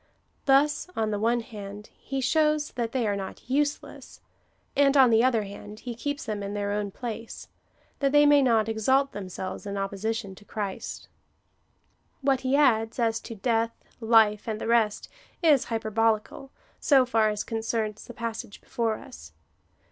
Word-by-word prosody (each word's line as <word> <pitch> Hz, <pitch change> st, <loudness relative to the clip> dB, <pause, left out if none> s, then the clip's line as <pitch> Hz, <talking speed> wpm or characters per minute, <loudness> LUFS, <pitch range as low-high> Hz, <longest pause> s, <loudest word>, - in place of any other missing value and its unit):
Thus 285 Hz, +4 st, +3 dB
on 220 Hz, -1 st, 0 dB
the 205 Hz, -, -1 dB
one 235 Hz, +2 st, +2 dB
hand, 210 Hz, -2 st, -9 dB
he 270 Hz, 0 st, -4 dB
shows 300 Hz, +3 st, +2 dB
that 235 Hz, -2 st, -3 dB
they 250 Hz, -2 st, 0 dB
are 205 Hz, -1 st, 0 dB
not 195 Hz, +3 st, -7 dB
useless, 290 Hz, +3 st, -2 dB, 0.6 s
and, 280 Hz, 0 st, +4 dB
on 260 Hz, -3 st, +7 dB
the 225 Hz, +1 st, +5 dB
other 240 Hz, -4 st, +2 dB
hand, 205 Hz, +1 st, -10 dB
he 245 Hz, -, -5 dB
keeps 285 Hz, +6 st, -4 dB
them 210 Hz, -3 st, -3 dB
in 200 Hz, +1 st, -4 dB
their 205 Hz, 0 st, -2 dB
own 205 Hz, 0 st, -1 dB
place, 230 Hz, +2 st, -7 dB, 0.5 s
that 275 Hz, -1 st, +2 dB
they 295 Hz, 0 st, +6 dB
may 290 Hz, -1 st, +6 dB
not 225 Hz, -5 st, +3 dB
exalt 260 Hz, +5 st, +2 dB
themselves 190 Hz, 0 st, -6 dB
in 200 Hz, 0 st, -4 dB
opposition 200 Hz, +1 st, -3 dB
to 195 Hz, -, -16 dB
Christ. 205 Hz, -2 st, -5 dB, 1.2 s
AVhat 270 Hz, -2 st, +3 dB
he 260 Hz, +1 st, 0 dB
adds, 225 Hz, -6 st, +3 dB
as 225 Hz, -2 st, +1 dB
to 230 Hz, -, -9 dB
death, 230 Hz, +1 st, 0 dB, 0.3 s
life, 220 Hz, -2 st, +4 dB
and 215 Hz, -1 st, -2 dB
the -, -, -4 dB
rest, 225 Hz, -2 st, +1 dB, 0.4 s
is 300 Hz, -6 st, +5 dB
hyperbolical, 225 Hz, +3 st, -1 dB, 0.3 s
so 270 Hz, -3 st, +4 dB
far 225 Hz, -3 st, +2 dB
as 210 Hz, -1 st, -2 dB
concerns 220 Hz, -1 st, -3 dB
the 240 Hz, -, -10 dB
passage 230 Hz, -2 st, -5 dB
before 225 Hz, -2 st, -2 dB
us. 80 Hz, +1 st, -12 dB
225 Hz, 165 wpm, -27 LUFS, 210-260 Hz, 1.2 s, on